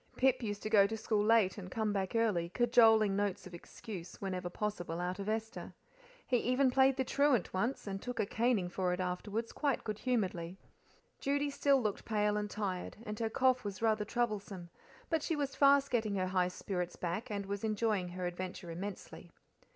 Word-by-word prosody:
Pip 265 Hz, 0 st, +3 dB
used 205 Hz, -3 st, -4 dB
to 215 Hz, -, -2 dB
go 200 Hz, -3 st, +6 dB
to 220 Hz, +2 st, -4 dB
school 215 Hz, -1 st, 0 dB
late 215 Hz, -3 st, +3 dB
and 185 Hz, -2 st, -8 dB
come 215 Hz, +1 st, -1 dB
back 195 Hz, +1 st, -2 dB
early, 205 Hz, -7 st, +1 dB
cajoling 225 Hz, -2 st, +5 dB
notes 200 Hz, -2 st, -1 dB
of 185 Hz, -, -11 dB
excuse, 180 Hz, +1 st, -9 dB
whenever, 185 Hz, -2 st, -3 dB
possible, 175 Hz, -4 st, -3 dB
out 180 Hz, +2 st, -3 dB
of 200 Hz, +1 st, -3 dB
Esther. 225 Hz, +1 st, -4 dB, 0.5 s
He 250 Hz, -, +2 dB
even 255 Hz, +2 st, +2 dB
played 265 Hz, +1 st, +4 dB
the 265 Hz, -, +2 dB
truant 280 Hz, -5 st, +2 dB
once, 235 Hz, +8 st, -1 dB
and 195 Hz, -1 st, -4 dB
took 245 Hz, 0 st, -5 dB
a -, -, +2 dB
caning 225 Hz, -3 st, +1 dB
for 180 Hz, 0 st, -1 dB
it 180 Hz, -, -3 dB
afterwards 200 Hz, +5 st, -3 dB
quite 280 Hz, -5 st, -1 dB
good 215 Hz, -1 st, -4 dB
humouredly. 190 Hz, -8 st, -1 dB, 0.6 s
Judy 285 Hz, +1 st, 0 dB
still 280 Hz, -1 st, +3 dB
looked 215 Hz, -5 st, -2 dB
pale 210 Hz, -1 st, +1 dB
and 210 Hz, 0 st, -2 dB
tired, 195 Hz, -4 st, -4 dB
and 210 Hz, 0 st, -5 dB
her 225 Hz, -1 st, 0 dB
cough 255 Hz, +1 st, +2 dB
was 200 Hz, -2 st, -5 dB
rather 215 Hz, -1 st, +2 dB
troublesome; 205 Hz, -6 st, -3 dB, 0.4 s
but 325 Hz, -2 st, +2 dB
she 325 Hz, -, -1 dB
was 285 Hz, -2 st, -2 dB
fast 280 Hz, 0 st, +5 dB
getting 220 Hz, -4 st, 0 dB
her 185 Hz, -1 st, 0 dB
high 185 Hz, -1 st, +2 dB
spirits 180 Hz, -1 st, -4 dB
back, 175 Hz, +5 st, -3 dB
and 200 Hz, -2 st, -3 dB
was 200 Hz, +1 st, -4 dB
enjoying 215 Hz, -3 st, 0 dB
her 180 Hz, +1 st, -5 dB
adventure 180 Hz, 0 st, -5 dB
immensely. 195 Hz, +4 st, -7 dB
210 Hz, 190 wpm, -33 LUFS, 185-235 Hz, 0.6 s, go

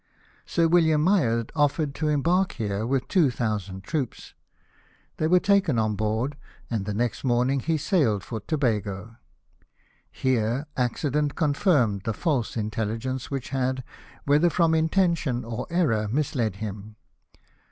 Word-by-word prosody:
Sir 165 Hz, -1 st, +2 dB
William 160 Hz, -3 st, +4 dB
Myers 125 Hz, -, +2 dB
offered 145 Hz, -1 st, +1 dB
to 155 Hz, +2 st, -2 dB
embark 170 Hz, +6 st, +2 dB
here 105 Hz, -1 st, -2 dB
with 135 Hz, 0 st, 0 dB
two 175 Hz, -8 st, +3 dB
thousand 105 Hz, -6 st, -3 dB
troops. 150 Hz, -4 st, -4 dB, 0.9 s
They'^were 175 Hz, +3 st, +3 dB
taken 195 Hz, -, +3 dB
on 110 Hz, -1 st, +1 dB
board, 110 Hz, +7 st, -1 dB, 0.3 s
and 110 Hz, -4 st, -1 dB
the 105 Hz, -, -3 dB
next 120 Hz, +1 st, -1 dB
morning 125 Hz, +2 st, +2 dB
he 160 Hz, +4 st, 0 dB
sailed 135 Hz, -, +1 dB
for 115 Hz, -, -5 dB
Tobago. 110 Hz, -, -2 dB, 0.9 s
Here 125 Hz, +1 st, 0 dB
accident 145 Hz, +3 st, 0 dB
confirmed 145 Hz, -, +2 dB
the 115 Hz, -, 0 dB
false 140 Hz, -10 st, -1 dB
intelli 110 Hz, 0 st, -2 dB
gence 130 Hz, +2 st, -4 dB
which 135 Hz, -3 st, -5 dB
had, 130 Hz, -1 st, -1 dB, 0.4 s
whether 150 Hz, +5 st, +4 dB
from 165 Hz, -1 st, +2 dB
intention 160 Hz, -6 st, +1 dB
or 115 Hz, +2 st, -5 dB
error, 135 Hz, -12 st, +1 dB
misled 120 Hz, -4 st, -1 dB
him. 105 Hz, +1 st, -7 dB
130 Hz, 130 wpm, -25 LUFS, 110-155 Hz, 0.9 s, William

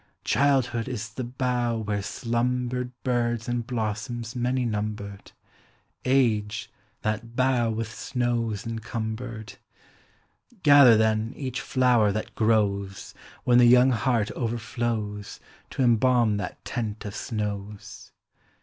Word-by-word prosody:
Childhood 130 Hz, -4 st, +2 dB
is 110 Hz, -4 st, -4 dB
the 120 Hz, +5 st, -5 dB
bough 120 Hz, -2 st, -1 dB
whore 100 Hz, -1 st, -1 dB
slumbered 125 Hz, +3 st, -1 dB
Birds 120 Hz, -2 st, 0 dB
aud 120 Hz, -1 st, -2 dB
blossoms 115 Hz, 0 st, -3 dB
many 125 Hz, +1 st, 0 dB
numbered; 105 Hz, -2 st, -4 dB, 0.4 s
— -, -, -39 dB, 0.2 s
Age, 105 Hz, -2 st, -2 dB, 0.3 s
that 115 Hz, +2 st, -3 dB
bough 125 Hz, -2 st, +2 dB
with 110 Hz, 0 st, -3 dB
suows 120 Hz, -3 st, -2 dB
encumbered. 110 Hz, 0 st, -5 dB, 1.1 s
Gather, 140 Hz, -6 st, +8 dB
theu. 110 Hz, +1 st, +1 dB
each 130 Hz, -3 st, -4 dB
flower 125 Hz, -5 st, +3 dB
that 110 Hz, -, -4 dB
grows, 100 Hz, -3 st, 0 dB, 0.3 s
When 120 Hz, 0 st, +5 dB
the 120 Hz, -, +7 dB
young 125 Hz, +2 st, +6 dB
heart 115 Hz, -2 st, +1 dB
overflows, 115 Hz, -3 st, -3 dB, 0.3 s
To 135 Hz, -, -1 dB
embalm 120 Hz, -2 st, +3 dB
that 100 Hz, -3 st, -6 dB
tent 110 Hz, -4 st, -4 dB
of 100 Hz, -, -5 dB
snows. 105 Hz, -2 st, -5 dB
115 Hz, 115 wpm, -26 LUFS, 105-125 Hz, 1.1 s, Gather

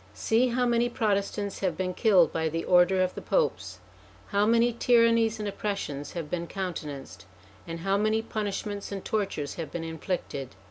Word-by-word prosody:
See 225 Hz, -, +2 dB
how 250 Hz, +1 st, +1 dB
many 240 Hz, 0 st, +2 dB
Protestants 205 Hz, -3 st, -1 dB
have 185 Hz, -5 st, -1 dB
been 185 Hz, -1 st, -1 dB
killed 190 Hz, -5 st, +4 dB
by 160 Hz, -1 st, 0 dB
the 165 Hz, +1 st, -3 dB
order 185 Hz, +1 st, +5 dB
of 185 Hz, -, -1 dB
the -, -, -7 dB
Popes. -, -, 0 dB, 0.5 s
How 205 Hz, 0 st, +2 dB
many 235 Hz, +1 st, +4 dB
tyrannies 230 Hz, -2 st, +3 dB
and 210 Hz, -, -3 dB
oppressions 195 Hz, -9 st, -4 dB
have 170 Hz, -3 st, -4 dB
been 170 Hz, +2 st, -3 dB
countenanced, 155 Hz, -, -6 dB, 0.4 s
and 165 Hz, 0 st, -5 dB
how 195 Hz, +2 st, +1 dB
many 215 Hz, +2 st, +1 dB
punishments 205 Hz, -2 st, -4 dB
and 195 Hz, -1 st, -5 dB
tortures 195 Hz, -9 st, -2 dB
have 160 Hz, -, -6 dB
been 170 Hz, -, -4 dB
inflicted 160 Hz, -, -4 dB
195 Hz, 170 wpm, -28 LUFS, 170-220 Hz, 0.5 s, order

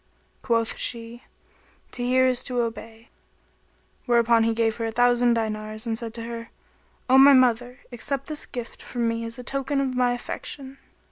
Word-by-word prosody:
Quoth 230 Hz, -2 st, 0 dB
she, 235 Hz, 0 st, -3 dB, 0.7 s
"To 245 Hz, -, -6 dB
hear 255 Hz, +1 st, +3 dB
is 255 Hz, -1 st, +1 dB
to 250 Hz, -2 st, -1 dB
obey;" 225 Hz, 0 st, -6 dB, 1.0 s
whereupon 235 Hz, -1 st, +4 dB
he 230 Hz, -, +2 dB
gave 225 Hz, -1 st, +1 dB
her 230 Hz, -1 st, -2 dB
a -, -, -3 dB
thousand 245 Hz, 0 st, +3 dB
dinars 215 Hz, 0 st, -3 dB
and 225 Hz, -1 st, -1 dB
said 230 Hz, 0 st, -3 dB
to 230 Hz, -, -5 dB
her, 230 Hz, 0 st, -7 dB, 0.6 s
"O 260 Hz, +1 st, +6 dB
my 280 Hz, +1 st, +9 dB
mother! 250 Hz, 0 st, +2 dB
accept 275 Hz, +3 st, -3 dB
this 305 Hz, -1 st, -5 dB
gift 240 Hz, -2 st, -7 dB
from 240 Hz, -2 st, -2 dB
me 230 Hz, 0 st, -1 dB
as 230 Hz, +1 st, -5 dB
a 250 Hz, -, -8 dB
token 275 Hz, +2 st, -1 dB
of 270 Hz, -2 st, -1 dB
my 250 Hz, -1 st, +2 dB
affection." 270 Hz, +2 st, -7 dB
240 Hz, 175 wpm, -25 LUFS, 230-255 Hz, 1.0 s, my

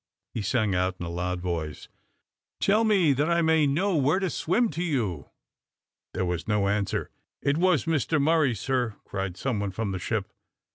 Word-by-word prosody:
he 115 Hz, -, -2 dB
sang 105 Hz, -1 st, +1 dB
out 90 Hz, 0 st, 0 dB
in 85 Hz, -, -4 dB
a -, -, -4 dB
loud 90 Hz, +1 st, -2 dB
voice. 85 Hz, -4 st, -4 dB, 0.7 s
"Tell 210 Hz, +3 st, +3 dB
me, 195 Hz, -9 st, +4 dB
that 145 Hz, +5 st, 0 dB
I 170 Hz, 0 st, +3 dB
may 160 Hz, -2 st, +4 dB
know 180 Hz, +7 st, +1 dB
where 145 Hz, +3 st, +3 dB
to 190 Hz, -3 st, -1 dB
swim 225 Hz, +8 st, +1 dB
to 165 Hz, +4 st, -3 dB
you." 110 Hz, -, -2 dB, 0.9 s
There 95 Hz, -, 0 dB
was 90 Hz, -1 st, -3 dB
no 105 Hz, -2 st, +2 dB
answer. 100 Hz, 0 st, -1 dB, 0.3 s
"It 140 Hz, +1 st, +2 dB
was 180 Hz, -4 st, +3 dB
Mr 160 Hz, -1 st, +1 dB
Murray, 150 Hz, -4 st, +3 dB
sir," 125 Hz, -1 st, -1 dB
cried 95 Hz, -2 st, -4 dB
some 130 Hz, -6 st, -1 dB
one 100 Hz, -1 st, -1 dB
from 100 Hz, +2 st, -3 dB
the 95 Hz, -, -3 dB
ship. -, -, -3 dB
130 Hz, 185 wpm, -27 LUFS, -, 0.9 s, me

